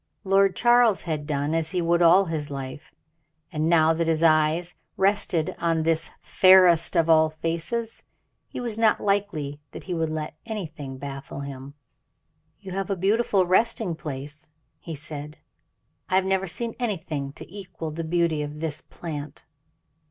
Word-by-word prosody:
Lord 195 Hz, -1 st, +3 dB
Charles 240 Hz, -4 st, +4 dB
had 155 Hz, -4 st, -3 dB
done 145 Hz, 0 st, -1 dB
as 165 Hz, -1 st, 0 dB
he 180 Hz, -, -1 dB
would 170 Hz, 0 st, +2 dB
all 175 Hz, +3 st, +6 dB
his 155 Hz, -4 st, -4 dB
life, 135 Hz, +2 st, -7 dB, 0.6 s
and 155 Hz, +1 st, -1 dB
now 160 Hz, -1 st, +4 dB
that 165 Hz, 0 st, -1 dB
his 165 Hz, 0 st, +1 dB
eyes 160 Hz, +2 st, +3 dB, 0.2 s
rested 190 Hz, -5 st, +1 dB
on 165 Hz, -1 st, +1 dB
this 165 Hz, 0 st, +1 dB
fairest 185 Hz, -3 st, +5 dB
of 165 Hz, -1 st, +3 dB
all 160 Hz, -1 st, +5 dB
faces, 170 Hz, +9 st, -3 dB, 0.5 s
it -, -, -5 dB
was 230 Hz, -3 st, -4 dB
not 225 Hz, -1 st, +3 dB
likely 195 Hz, -8 st, -1 dB
that -, -, -8 dB
he 185 Hz, -, -4 dB
would 165 Hz, -2 st, -1 dB
let 155 Hz, -1 st, -4 dB
anything 160 Hz, -, -6 dB
baffle 140 Hz, 0 st, -7 dB
him. 140 Hz, 0 st, -8 dB, 0.8 s
"You 195 Hz, -2 st, -9 dB
have 195 Hz, +1 st, -3 dB
a 195 Hz, -, 0 dB
beautiful 195 Hz, +1 st, +2 dB
resting 210 Hz, +1 st, +2 dB
place," 150 Hz, -1 st, -7 dB, 0.3 s
he 165 Hz, -, -7 dB
said. 150 Hz, 0 st, -8 dB, 0.7 s
"I 185 Hz, -, +1 dB
have 190 Hz, 0 st, +3 dB
never 190 Hz, 0 st, 0 dB
seen 230 Hz, +6 st, -3 dB
anything 160 Hz, -, -3 dB
to -, -, -10 dB
equal 185 Hz, -5 st, -7 dB
the 165 Hz, +2 st, -5 dB
beauty 165 Hz, -2 st, 0 dB
of 150 Hz, +1 st, -6 dB
this 160 Hz, -1 st, -4 dB
plant." 150 Hz, -3 st, -8 dB
165 Hz, 160 wpm, -25 LUFS, 155-190 Hz, 0.8 s, all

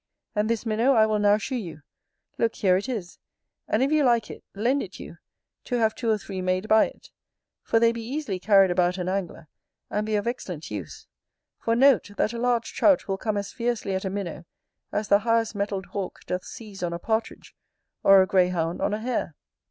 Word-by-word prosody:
And 210 Hz, 0 st, 0 dB
this 230 Hz, 0 st, -1 dB
minnow 230 Hz, +5 st, +2 dB
I 220 Hz, -3 st, +5 dB
will 215 Hz, -1 st, 0 dB
now 205 Hz, 0 st, +4 dB
shew 255 Hz, +4 st, -3 dB
you; 165 Hz, -9 st, -7 dB, 0.6 s
look, 230 Hz, -1 st, +1 dB
here 185 Hz, -3 st, +3 dB
it 200 Hz, +7 st, -2 dB
is, 205 Hz, -8 st, -5 dB, 0.5 s
and, 220 Hz, +4 st, +2 dB
if 275 Hz, -, +1 dB
you 305 Hz, -1 st, +3 dB
like 235 Hz, -3 st, +2 dB
it, -, -, -11 dB
lend 245 Hz, +7 st, +1 dB
it -, -, -8 dB
you, -, -, -10 dB, 0.5 s
to 250 Hz, -, -2 dB
have 220 Hz, -2 st, +2 dB
two 235 Hz, -, -3 dB
or 215 Hz, -, +3 dB
three 195 Hz, -2 st, -6 dB
made 185 Hz, +2 st, -1 dB
by 220 Hz, 0 st, +5 dB
it; -, -, -16 dB, 0.5 s
for 225 Hz, -, +2 dB
they 230 Hz, 0 st, +4 dB
be 235 Hz, 0 st, -6 dB
easily 245 Hz, -4 st, -4 dB
carried 195 Hz, -1 st, +5 dB
about 180 Hz, +1 st, +1 dB
an 180 Hz, -1 st, -3 dB
angler, 185 Hz, -4 st, -3 dB, 0.4 s
and 210 Hz, -, 0 dB
be 215 Hz, -, 0 dB
of 205 Hz, -, 0 dB
excellent 180 Hz, -, -5 dB
use: 100 Hz, -7 st, -7 dB, 0.5 s
for 230 Hz, -, 0 dB
note, 260 Hz, -3 st, +4 dB
that 220 Hz, -, +1 dB
a 235 Hz, -, -4 dB
large 240 Hz, -1 st, 0 dB
Trout 290 Hz, -3 st, +3 dB
will 195 Hz, -1 st, -2 dB
come 215 Hz, -2 st, -1 dB
as 200 Hz, 0 st, -4 dB
fiercely 235 Hz, -5 st, -2 dB
at 190 Hz, -, -2 dB
a 190 Hz, -, -2 dB
minnow 185 Hz, -3 st, -5 dB, 0.5 s
as 210 Hz, 0 st, -2 dB
the 200 Hz, -, +5 dB
highest 230 Hz, 0 st, +1 dB
mettled 200 Hz, -2 st, -3 dB
hawk 190 Hz, +1 st, -6 dB
doth 180 Hz, 0 st, -3 dB
seize 210 Hz, -4 st, -10 dB
on 175 Hz, -1 st, -2 dB
a -, -, -2 dB
partridge, 220 Hz, +5 st, -3 dB, 0.5 s
or 195 Hz, -1 st, +7 dB
a -, -, 0 dB
greyhound 180 Hz, -3 st, +1 dB
on 210 Hz, -, +1 dB
a -, -, -5 dB
hare. 230 Hz, -, -2 dB
210 Hz, 215 wpm, -25 LUFS, 190-230 Hz, 0.6 s, or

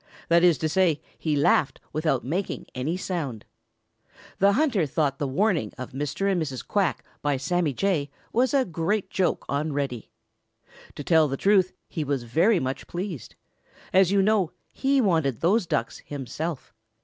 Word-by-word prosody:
That 170 Hz, +1 st, +5 dB
is 175 Hz, -4 st, +5 dB
to 155 Hz, -, -1 dB
say, 165 Hz, -2 st, +2 dB, 0.2 s
he 155 Hz, -2 st, 0 dB
laughed 145 Hz, 0 st, +2 dB
without 155 Hz, -4 st, 0 dB
making 180 Hz, +9 st, -3 dB
any 145 Hz, +8 st, -2 dB
sound. 155 Hz, -, -4 dB, 0.9 s
The 200 Hz, +1 st, +5 dB
hunter 235 Hz, -, +2 dB
thought 140 Hz, -1 st, 0 dB
the 145 Hz, -, -1 dB
warning 165 Hz, -, +1 dB
of 130 Hz, -1 st, -7 dB
Mr. 150 Hz, +9 st, -1 dB
and 180 Hz, -3 st, +1 dB
Mrs. 135 Hz, -5 st, -5 dB
Quack 195 Hz, -5 st, 0 dB, 0.2 s
by 145 Hz, -2 st, +1 dB
Sammy 170 Hz, +3 st, 0 dB
Jay 150 Hz, -1 st, 0 dB, 0.2 s
was 250 Hz, +3 st, +3 dB
a 275 Hz, -3 st, +3 dB
great 185 Hz, +3 st, -1 dB
joke 185 Hz, -3 st, 0 dB
on 145 Hz, +2 st, -1 dB
Reddy. 135 Hz, -5 st, -3 dB, 0.9 s
To 145 Hz, -, -6 dB
tell 160 Hz, 0 st, +4 dB
the 135 Hz, -1 st, -3 dB
truth, 195 Hz, 0 st, +3 dB
he 160 Hz, -, -3 dB
was 140 Hz, -3 st, -1 dB
very 170 Hz, -, +3 dB
much 130 Hz, -1 st, -4 dB
pleased. 175 Hz, -, -5 dB, 0.6 s
As 190 Hz, -1 st, +5 dB
you 200 Hz, -1 st, +4 dB
know, 200 Hz, -5 st, +2 dB, 0.2 s
he 275 Hz, 0 st, +2 dB
wanted 160 Hz, -, +1 dB
those 190 Hz, +3 st, +2 dB
Ducks 115 Hz, -, -1 dB
himself. 145 Hz, +2 st, -5 dB
165 Hz, 160 wpm, -25 LUFS, 140-190 Hz, 0.9 s, That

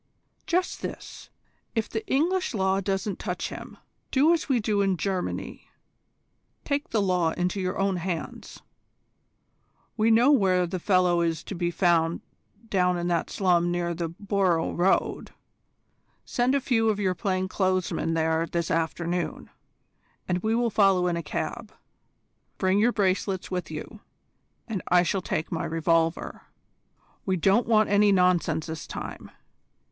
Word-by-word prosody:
"Just 360 Hz, 0 st, 0 dB
this: -, -, -8 dB, 0.5 s
if 225 Hz, -1 st, 0 dB
the 440 Hz, -, -4 dB
English 345 Hz, +1 st, +1 dB
law 190 Hz, -1 st, +1 dB
won't 195 Hz, 0 st, -1 dB
touch 180 Hz, -3 st, -3 dB
him, -, -, -9 dB, 0.3 s
do 295 Hz, +5 st, +4 dB
as 325 Hz, -3 st, -2 dB
we 255 Hz, -3 st, +3 dB
do 210 Hz, -2 st, 0 dB
in 195 Hz, -2 st, +1 dB
Germany, 190 Hz, 0 st, -4 dB, 1.0 s
take 285 Hz, 0 st, -1 dB
the 220 Hz, -, +1 dB
law 180 Hz, -4 st, +1 dB
into 180 Hz, +2 st, -1 dB
your 185 Hz, 0 st, -2 dB
own 195 Hz, -1 st, +1 dB
hands. 175 Hz, -1 st, -5 dB, 1.3 s
We 220 Hz, 0 st, +2 dB
know 235 Hz, +5 st, +5 dB
where 190 Hz, -9 st, +3 dB
the 180 Hz, +1 st, -4 dB
fellow 180 Hz, -2 st, +3 dB
is 165 Hz, -2 st, -1 dB
to -, -, -7 dB
be 175 Hz, -1 st, -1 dB
found 170 Hz, -2 st, +2 dB, 0.5 s
down 180 Hz, -3 st, +1 dB
in 175 Hz, 0 st, -2 dB
that 170 Hz, -2 st, 0 dB
slum 175 Hz, -3 st, +2 dB
near 175 Hz, 0 st, -1 dB
the 170 Hz, 0 st, -3 dB
Borough 185 Hz, -2 st, 0 dB
Road. 180 Hz, +2 st, +1 dB, 1.0 s
Send 250 Hz, +3 st, +1 dB
a -, -, +3 dB
few 225 Hz, -3 st, +2 dB
of 210 Hz, -1 st, 0 dB
your 190 Hz, -3 st, +1 dB
plain 185 Hz, -1 st, -1 dB
clothes 185 Hz, -1 st, 0 dB
men 165 Hz, 0 st, -1 dB
there 160 Hz, 0 st, +1 dB
this 170 Hz, -1 st, -2 dB
afternoon, 170 Hz, +2 st, -2 dB, 0.8 s
and 180 Hz, -1 st, 0 dB
we 220 Hz, +4 st, 0 dB
will 235 Hz, -1 st, +1 dB
follow 195 Hz, -3 st, +3 dB
in 175 Hz, -1 st, +1 dB
a 170 Hz, -, -2 dB
cab. 150 Hz, -, -5 dB, 0.9 s
Bring 190 Hz, +1 st, +2 dB
your 235 Hz, +3 st, +4 dB
bracelets 190 Hz, -3 st, -1 dB
with 180 Hz, -1 st, -3 dB
you, -, -, -7 dB, 0.7 s
and 215 Hz, -6 st, -3 dB
I 175 Hz, 0 st, +5 dB
shall 185 Hz, +3 st, -1 dB
take 160 Hz, -, -3 dB
my 165 Hz, -, -2 dB
revolver. 165 Hz, 0 st, 0 dB, 0.8 s
We 190 Hz, -1 st, 0 dB
don't 195 Hz, +7 st, +3 dB
want 215 Hz, -2 st, +3 dB
any 205 Hz, 0 st, +4 dB
nonsense 180 Hz, -4 st, +2 dB
this 160 Hz, -2 st, -6 dB
time. -, -, -7 dB
185 Hz, 150 wpm, -26 LUFS, 175-210 Hz, 1.3 s, know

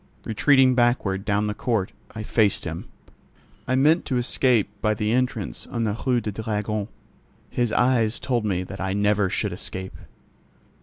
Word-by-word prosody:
Retreating 130 Hz, +3 st, +4 dB
backward, 120 Hz, -6 st, +1 dB
down 105 Hz, 0 st, +1 dB
the 105 Hz, -, -1 dB
court, 105 Hz, -4 st, -1 dB, 0.2 s
I 110 Hz, -, -4 dB
faced 105 Hz, -2 st, +2 dB
him. 80 Hz, -1 st, -5 dB, 0.8 s
I 130 Hz, -, +1 dB
meant 150 Hz, +6 st, +4 dB
to 130 Hz, -, -1 dB
escape 120 Hz, -2 st, +2 dB
by 110 Hz, 0 st, +2 dB
the 105 Hz, 0 st, -1 dB
entrance 125 Hz, +1 st, -1 dB
on 115 Hz, -1 st, -2 dB
the 105 Hz, -2 st, 0 dB
Rue 125 Hz, -2 st, +3 dB
du 110 Hz, -, -4 dB
Dragon. 105 Hz, 0 st, -2 dB, 0.6 s
His 120 Hz, -2 st, 0 dB
eyes 120 Hz, -3 st, +2 dB
told 120 Hz, -4 st, -1 dB
me 95 Hz, -4 st, -1 dB
that 95 Hz, +1 st, -8 dB
I 95 Hz, 0 st, -1 dB
never 105 Hz, -1 st, +2 dB
should 105 Hz, 0 st, -1 dB
escape. 95 Hz, +1 st, -6 dB
110 Hz, 160 wpm, -24 LUFS, 100-125 Hz, 0.8 s, Retreating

